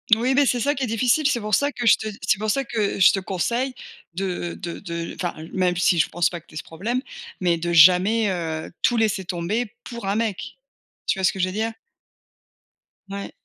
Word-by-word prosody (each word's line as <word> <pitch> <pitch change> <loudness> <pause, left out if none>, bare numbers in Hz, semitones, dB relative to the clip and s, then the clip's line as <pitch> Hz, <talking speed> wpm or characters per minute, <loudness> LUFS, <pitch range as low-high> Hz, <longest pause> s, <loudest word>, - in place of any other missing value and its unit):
Oui, 245 +4 +1
mais 280 +1 +4
c'est 245 - +1
ça 285 +5 +1
qui 270 - -3
est 255 - 0
difficile. 250 +6 +2
C'est 245 -4 +1
pour 210 0 -5
ça 285 +1 +3
que 240 - -5
je 230 - +7
te 220 - -5 0.2
c'est 210 - +2
pour 215 - -2
ça 275 +6 +1
que 220 -6 -2
je 185 - +7
te 195 - -1
conseille 235 +8 -1 0.4
de 180 -2 -3
de 170 -1 -6
de 170 -3 -5
enfin 175 -2 -3 0.2
même 180 -2 +1
si 175 -1 +3
je 155 - +3
pense 175 0 +1
pas 175 - -6
que 170 - -35
tu - - -17
aies - - -5
ce - - -5
problème, 225 +10 -3 0.4
mais 175 -2 +2
de 170 +1 -2
jamais, 185 +7 +6
heu, 160 -3 -4
tout 240 - +2
laisser 215 -4 +1
tomber 195 +6 -2
pour 235 -5 -7
un 200 - 0
mec. 220 -4 -3 0.5
Tu - - 0
vois - - -3
ce 185 - +4
que 190 - -8
je 185 - +2
veux 185 - -5
dire? 220 +2 -1 1.4
Ouais. 200 0 -6
200 Hz, 230 wpm, -23 LUFS, 175-235 Hz, 1.4 s, je